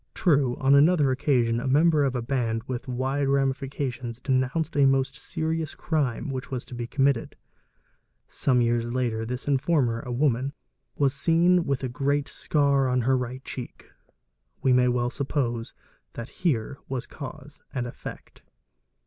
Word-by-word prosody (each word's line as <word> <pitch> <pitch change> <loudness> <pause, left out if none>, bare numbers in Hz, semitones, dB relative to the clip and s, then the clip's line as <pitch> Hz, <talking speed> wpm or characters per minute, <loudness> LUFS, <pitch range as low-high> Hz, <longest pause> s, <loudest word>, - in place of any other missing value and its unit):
_ - - -48
'True, 140 - +2
on 135 +1 +4
another 145 -1 +5
occasion 125 -4 +1
a 130 - -3
member 150 +2 +4
of 135 -2 0
a 120 - -2
band 115 -3 -1
with 125 -1 -5
wide 130 +3 -1
ramifications 135 -3 -1
Zenounced 135 +6 0
a 140 -1 +5
most 135 0 +1
serious 160 +1 -3
crime 145 -4 -1
which 130 -1 -5
was 130 -2 -4
to - - -11
be 120 -1 -4
committed. 135 -2 +1 0.9
Some 125 -3 +1
years 120 0 +1
ii 125 -2 0 0.3
informer, 135 -4 +1
a 125 - -6
woman, 130 +1 +1 0.4
was 140 -2 +2
seen 170 +4 +3
with 140 -1 -1
a - - 0
great 140 +3 0
scar 140 -3 +1
on 125 0 +2
her 130 +3 +2
right 125 +1 -3
a - - -5
heek. 125 -2 -9 0.7
We 130 - +4
may 125 0 +4
well 120 0 +1
suppose 130 -5 -2 0.4
that 115 +1 -7
here 140 -5 0
was 130 -2 -3
cause 145 0 -10
and 125 -4 -2
effect. 120 - -9
135 Hz, 155 wpm, -26 LUFS, 125-145 Hz, 0.9 s, another